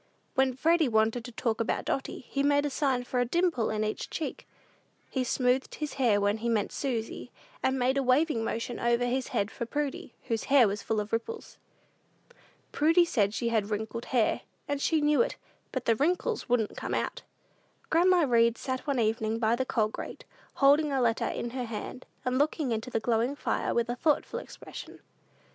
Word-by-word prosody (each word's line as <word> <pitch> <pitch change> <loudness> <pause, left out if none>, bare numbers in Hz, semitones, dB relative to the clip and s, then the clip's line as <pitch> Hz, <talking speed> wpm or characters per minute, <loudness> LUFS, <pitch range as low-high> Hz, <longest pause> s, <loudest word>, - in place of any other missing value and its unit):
When 265 -2 +2
Freddy 325 +3 +3
wanted 225 +1 +2
to 245 - -7
talk 225 -1 -1
about 230 - -1
Dotty, 270 -1 -3
he 275 - -1
made 285 +1 +3
a 290 - -1
sign 265 -3 +1
for 250 0 -2
a - - +4
dimple 325 -2 +1
in 215 0 -1
each 215 0 -3
cheek. 320 - -5 0.6
He 260 - 0
smoothed 250 +1 +1
his 300 -1 -4
hair 220 -5 +4
when 205 +1 +1
he 235 +2 -2
meant 215 -3 0
Susy, 245 -2 -3 0.3
and 265 0 +1
made 260 +2 +2
a - - +2
waving 255 -1 +2
motion 230 +2 -3
over 235 +1 +2
his 255 +1 -1
head 200 +2 -1
for 235 - -5
Prudy, 290 -2 -3
whose 225 -1 -2
hair 270 -5 +6
was 200 +1 -3
full 220 +1 -1
of 210 +1 -5
ripples. 445 - -4 1.1
Prudy 330 +3 +4
said 210 -11 +1
she 235 - 0
had 215 -3 0
wrinkled 220 +2 -3
hair, 240 -4 +1 0.3
and 285 -1 -2
she 315 0 +2
knew 295 0 +4
it; 485 - 0 0.4
but 260 -2 -3
the 230 - +4
wrinkles 355 - 0
"wouldn't 235 -3 +1
come - - -3
out." - - -2 0.7
Grandma 355 +2 +5
Read 235 -1 +4
sat 260 +2 -4
one 275 -3 +1
evening 220 0 0
by 225 0 +2
the 260 +1 -2
coal 220 -3 +2
grate, - - -8 0.3
holding 290 +2 +4
a 270 - +1
letter 235 -2 +1
in 235 - -3
her 250 0 -3
hand, 230 +3 -6 0.2
and 255 +1 +1
looking 295 -2 +1
into 225 +2 -2
the 225 - 0
glowing 235 +4 +1
fire - - -1
with 235 0 +1
a 240 - -2
thoughtful 300 +3 0
expression. - - -10
245 Hz, 195 wpm, -29 LUFS, 225-280 Hz, 1.1 s, hair